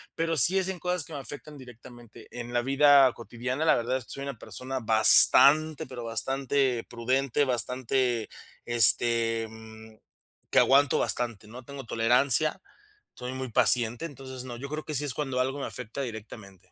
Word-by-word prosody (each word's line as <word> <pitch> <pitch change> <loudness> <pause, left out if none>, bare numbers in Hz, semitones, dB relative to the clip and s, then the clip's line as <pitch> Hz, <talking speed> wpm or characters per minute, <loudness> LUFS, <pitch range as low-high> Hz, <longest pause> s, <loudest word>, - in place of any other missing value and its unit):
pero 165 0 -2
sí 170 +9 +5
es 190 - -3
en 190 -2 -6
cosas 180 0 -2
que 160 - -13
me 145 - -6
afectan 145 +2 -7
directamente. 120 -2 -15
En 120 0 -8
la 120 - +1
vida 135 0 +4
cotidiana, 120 +5 -5
la 160 - +4
verdad 120 +2 -2
es 130 - -11
que - - -11
soy 140 - -6
una 140 -3 -7
persona 130 +4 -7
bastante, 140 +7 +5
pero 125 -2 -9
bastante 130 +2 -1
prudente, 130 +3 -1
bastante, 125 -1 -1 0.4
este, 115 0 +2
mm, 110 0 -14 0.6
que - - +4
aguanto 140 +1 +3
bastante, 115 -4 -2
¿no?, 120 +3 -12
tengo 140 0 -10
tolerancia, 125 +9 +2 0.5
soy 125 +1 -7
muy 130 -2 -6
paciente, 120 +4 +2
entonces, 130 -4 -9
no, 120 -2 -8
yo 140 +3 -8
creo 155 +1 -6
que 155 - -5
sí 145 - +1
es 140 - -1
cuando 135 -4 -3
algo 135 +2 -3
me - - -4
afecta 125 +2 -7
directamente. 105 -6 -10
125 Hz, 170 wpm, -26 LUFS, 115-140 Hz, 0.6 s, sí